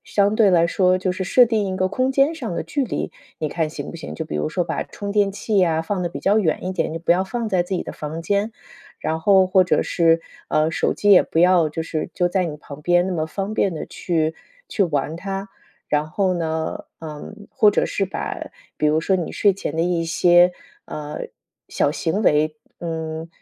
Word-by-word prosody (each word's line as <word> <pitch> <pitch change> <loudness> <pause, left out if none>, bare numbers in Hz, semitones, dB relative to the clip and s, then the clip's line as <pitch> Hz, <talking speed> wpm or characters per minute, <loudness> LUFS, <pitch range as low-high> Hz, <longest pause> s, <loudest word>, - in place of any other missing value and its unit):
相 200 0 +1
对 215 -2 +5
来 170 -2 +4
说 185 +1 +3
就 185 0 -1
是 190 - -4
设 250 +7 +6
定 220 -3 0
一 190 -1 -3
个 185 0 +1
空 255 +6 0
间 275 +4 +3
上 240 - -5
的 165 - -2
距 275 - -1
离， - - -3 0.2
你 155 - -3
看 160 -2 -1
行 155 - -7
不 - - -8
行？ 150 - -7
就 - - -4
比 - - -7
如 75 0 -1
说 175 - -1
把 - - -2
充 200 -1 -6
电 205 -1 +3
器 205 +1 -1
呀， 165 -3 +2
放 185 +2 -2
得 175 - -1
比 170 - -7
较 205 +2 +3
远 170 -6 0
一 185 - -2
点， - - -1
就 - - -3
不 170 +1 +3
要 185 - +2
放 225 +3 -3
在 180 -2 +2
自 185 +2 -4
己 180 - -1
的 - - -7
房 155 +2 -6
间。 200 +5 0 0.5
然 160 0 -2
后 190 +2 +5
或 185 0 +5
者 180 - +2
是， 165 -1 +2 0.3
呃， 155 +1 +2
手 - - 0
机 205 - +2
也 195 - +8
不 - - -3
要 175 -2 +5
就 155 +2 -4
是 160 0 -3
就 175 - +1
在 180 0 0
你 150 -2 -5
旁 145 -1 -11
边 175 +3 +3
那 190 - -2
么 160 -2 -1
方 195 +5 -4
便 195 -4 +1
的 155 - -4
去 160 -2 -1 0.4
去 210 - +1
玩 150 -1 -2
它。 195 +2 -5 0.4
然 150 +1 +1
后 190 +3 +1
呢， 160 -2 -3
嗯， 165 +7 -9
或 220 -6 +4
者 - - +1
是 195 - -1
把 - - -5 0.3
比 150 - +2
如 150 +1 +3
说 180 +4 +1
你 180 -3 -1
睡 205 -2 +3
前 180 -5 -5
的 165 - +2
一 170 -1 0
些， 175 +2 +5 0.3
呃， 150 -1 -6 0.5
小 - - +1
行 165 +6 -1
为， 155 -3 +2 0.2
嗯， 160 -1 -4
175 Hz, 245 characters per minute, -22 LUFS, 160-195 Hz, 0.5 s, 也